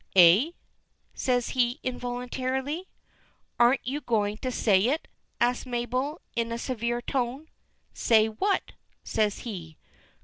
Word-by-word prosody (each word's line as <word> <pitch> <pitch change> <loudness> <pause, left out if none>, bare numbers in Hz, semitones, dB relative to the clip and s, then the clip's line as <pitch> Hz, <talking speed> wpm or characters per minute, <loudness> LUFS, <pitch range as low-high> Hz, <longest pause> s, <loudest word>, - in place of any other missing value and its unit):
"Eh?" 185 - +7 0.6
says 245 -2 0
he, 245 +2 +1
involuntarily. 255 +6 -3 0.7
"Aren't 240 +3 +4
you 280 +4 -2
going 210 -4 0
to 255 +2 -3
say 205 -3 +3
it?" 300 +5 -1 0.3
asks 245 +1 +2
Mabel, 255 +5 -2
in 230 0 -1
a 230 - -2
severe 240 -1 -2
tone. 265 +4 -2 0.4
"Say 220 -2 +4
what?" 300 - -1 0.3
says 210 -2 0
he. 170 -9 -7
245 Hz, 115 wpm, -27 LUFS, 225-260 Hz, 0.7 s, Eh